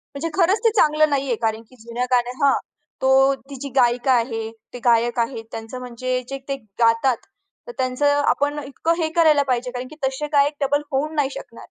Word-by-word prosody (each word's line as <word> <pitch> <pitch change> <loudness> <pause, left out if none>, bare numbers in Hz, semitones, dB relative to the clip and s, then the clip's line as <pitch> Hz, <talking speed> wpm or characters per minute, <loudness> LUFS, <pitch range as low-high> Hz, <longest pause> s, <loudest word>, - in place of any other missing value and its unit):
म्हणजे 325 +4 -3
खरंच 380 +4 +3
ते 455 - +6
चांगलं 305 -5 +4
नाहीये, 275 -4 0
कारण 220 0 -2
की 255 - -18
जुन्या 235 +2 -4
गाण्या 245 0 +2
हां, 275 - +5 0.5
तो 265 - +2 0.4
ती 275 - -7
जी 280 - -4
गायिका 245 0 +3
आहे. 225 -2 -1 0.2
ते 245 - -7
गायक 235 +1 +3
आहे 235 0 -1
त्यांचं 225 +3 -7
म्हणजे 250 +1 -3
जे 275 - -4
ते 275 - -1 0.2
गातात, 230 +2 +3 0.5
तर - - -6
त्यांचं 285 +3 +1
आपण 290 0 +1
इतकं 315 +4 -1
हे 315 - 0
करायला 310 -4 +5
पाहिजे, 250 -1 -1
कारण 250 0 -5
की 310 - -12
तसे 265 +3 -2
गायक 285 +1 +4
डबल 290 +2 +1
होऊ 285 +3 0
नाही 280 -2 +1
शकणार. 230 - -10
265 Hz, 195 wpm, -22 LUFS, 240-290 Hz, 0.5 s, ते